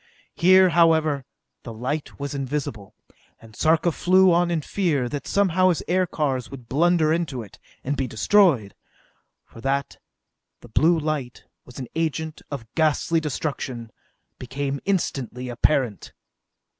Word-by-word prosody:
Here, 185 +1 +5
however, 160 -5 +3 0.4
the 115 - -8
light 130 +9 -4
was 140 +1 -4
invisible, 135 -7 -4 0.4
and 110 -1 -16
Sarka 160 +2 +2
flew 185 +3 +4
on 175 0 +2
in 165 -2 0
fear 150 -7 -1
that 145 +3 -5
somehow 185 -2 +3
his 175 - 0
aircars 155 -8 0
would 125 -4 -11
blunder 160 +3 +2
into 155 -8 -2
it, 100 - -16 0.2
and 140 +2 -1
be 135 -2 -2
destroyed 125 - +3 0.7
for 115 - -14
that 140 +2 -2 0.6
the 120 - -14
blue 165 +9 +3
light 150 -5 -4 0.2
was 125 - -14
an 130 - -5
agent 160 -1 -3
of 140 -6 -6
ghastly 160 +1 +1
destruction 135 -6 -4 0.5
became 135 +2 -4
instantly 130 - -2
apparent. 120 - 0
150 Hz, 130 wpm, -23 LUFS, 125-165 Hz, 0.7 s, Here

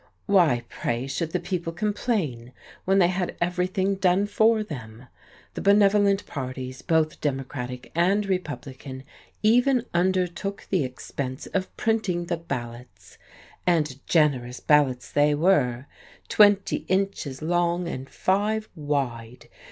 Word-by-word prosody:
Why, 170 - +3
pray, 120 +2 -3
should 155 +4 -3
the 180 - 0
people 175 -3 -3
complain, 175 - -2 0.3
when 195 +1 +3
they 180 -3 +5
had 180 -1 -2
everything 185 +2 0
done 190 0 +2
for 220 +2 +3
them? 120 - -9 0.5
The - - -5
benevolent 200 0 +4
parties, 130 -2 -6
both 160 -2 +1
Democratic 130 -3 -4
and 190 +5 +2
Republican, 140 -7 -5 0.4
even 245 +3 +4
undertook 185 +2 0
the 185 -6 +2
expense 130 +1 -5
of 190 -1 -2
printing 200 -6 0
the 170 -1 -2
ballots! 120 - -8 0.5
And 150 -6 +1
generous 130 -6 +2
ballots 140 -4 +2
they 145 0 +3
were 140 -7 +2 0.4
(twenty 205 -2 +4
inches 185 -8 -1
long 175 +1 +1
and 135 -4 -6
five 215 +3 0
wide!) 130 -6 -3
170 Hz, 120 wpm, -25 LUFS, 130-195 Hz, 0.5 s, they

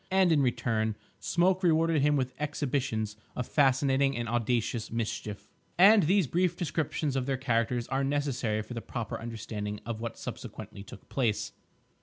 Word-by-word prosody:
And, 190 -2 +4
in 150 -3 +4
return, 110 -4 0 0.2
Smoke 180 - +2
rewarded 165 -3 +3
him 150 +1 +3
with 130 -2 -1
exhibitions 130 -7 -1 0.2
of 125 - -2
fascinating 135 -1 +3
and 120 -1 -2
audacious 120 0 0
mischief. 110 -2 -4 0.3
And 200 +4 +8
these 190 +2 +3
brief 175 +4 +1
descriptions 155 -3 -1
of 130 -1 -1
their 135 -1 0
characters 120 -2 0
are 135 +1 0
necessary 135 -6 0
for 120 - -8
the 115 - -4
proper 120 -2 -5
understanding 105 -2 -5
of 115 -1 -4
what 115 -1 -4
subsequently 100 - -7
took 100 0 -12
place. 115 -6 0
130 Hz, 155 wpm, -29 LUFS, 115-150 Hz, 0.3 s, And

